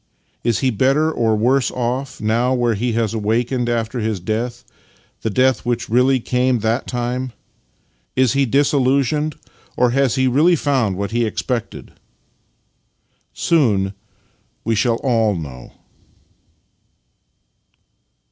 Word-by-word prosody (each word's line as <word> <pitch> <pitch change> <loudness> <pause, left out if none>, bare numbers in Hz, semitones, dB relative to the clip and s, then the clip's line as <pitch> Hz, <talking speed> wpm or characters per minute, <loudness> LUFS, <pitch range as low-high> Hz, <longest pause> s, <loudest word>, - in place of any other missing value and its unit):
Is 115 -2 0
he 130 -1 +2
better 135 +8 +2
or 115 -7 +1
worse 125 +5 +2
off 130 +2 -3
now 120 +4 +1
where 120 -2 +1
he 115 +3 -1
has 115 -2 0
awakened 120 +3 0
after 115 +1 -1
his 110 -3 -2
death 115 +6 -3 0.3
— - - -36
the 110 - -1
death 130 +2 +2
which 120 0 -2
really 130 +2 +3
came 125 0 0
that 115 +3 -1
time? 125 0 -3 0.8
Is 130 -1 +3
he 140 -1 +2
disillusioned, 140 +3 +1 0.4
or 125 -1 +3
has 135 -1 +2
he 130 -1 +2
really 155 +8 +4
found 130 - 0
what 100 +1 -3
he 120 +1 +1
expected? 115 +1 -4 1.4
Soon 105 - +1 0.7
we 115 - 0
shall 115 +2 +2
all 115 -6 +2
know. 70 -7 -8
120 Hz, 125 wpm, -19 LUFS, 110-130 Hz, 1.4 s, really